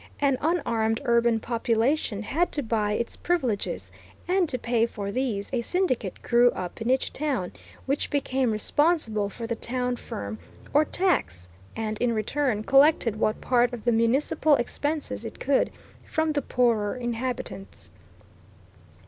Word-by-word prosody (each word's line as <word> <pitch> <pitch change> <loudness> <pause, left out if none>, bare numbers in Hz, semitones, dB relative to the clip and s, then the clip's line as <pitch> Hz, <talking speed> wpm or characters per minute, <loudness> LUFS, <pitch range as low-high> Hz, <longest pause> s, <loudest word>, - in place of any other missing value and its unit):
An 275 -3 +2
unarmed 230 -9 +1
urban 235 -1 +3
population 230 0 0
had 335 +11 0
to 290 - +1
buy 215 -3 0
its 235 +2 -2
privileges, 260 -13 -1 0.4
and 360 -2 +2
to 255 - 0
pay 235 -1 +1
for 200 -3 -5
these 235 -4 -2
a 245 - +1
syndicate 255 - -1
grew 240 0 +5
up 180 +4 -6
in 230 - -1
each 260 +1 +1
town, 265 -12 -1 0.3
which 275 +2 -1
became 265 -3 0
responsible 220 -2 +1
for 230 +3 -7
the 230 - -2
town 250 +2 -2
ferm, 100 - -6 0.3
or 300 +2 +5
tax, 90 - 0 0.3
and, 215 -1 -3
in 245 -1 +2
return, 220 0 0
collected 275 -4 +4
what 215 0 0
part 245 -1 +2
of 235 - -6
the 240 - +4
municipal 265 +6 +3
expenses 290 +5 -2
it - - -8
could 280 -1 +2 0.3
from 315 0 0
the 295 -1 0
poorer 235 -5 +1
inhabitants. 240 -4 -5
240 Hz, 145 wpm, -26 LUFS, 220-280 Hz, 0.4 s, grew